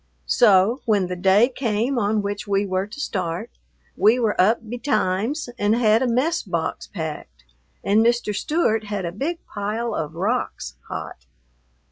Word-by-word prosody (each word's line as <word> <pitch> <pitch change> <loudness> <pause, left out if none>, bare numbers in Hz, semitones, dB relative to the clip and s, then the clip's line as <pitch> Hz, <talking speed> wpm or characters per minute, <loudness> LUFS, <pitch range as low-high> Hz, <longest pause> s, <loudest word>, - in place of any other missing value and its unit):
So, 210 +3 +4
when 205 -4 +2
the 180 0 -4
day 195 +5 +4
came 245 0 -1
on 210 -1 +1
which 205 +1 -4
we 200 0 +1
were 190 0 -1
to 215 +7 -10
start, 175 - -3 0.4
we 215 +5 +4
were 220 -3 +1
up 220 +4 +2
betimes 245 +2 -1
and 205 +2 +2
had 225 -1 +3
a 260 - +1
mess 280 +8 +1
box 170 -5 -3
packed 160 - -7 0.4
and 210 +3 +3
Mr. 235 -2 +1
Stewart 225 - 0
had 205 -3 -3
a 170 - -3
big 295 - -4
pile 215 +3 -3
of 155 0 -4
rocks 190 - -2
hot. 60 0 -7
210 Hz, 155 wpm, -22 LUFS, 190-240 Hz, 0.4 s, So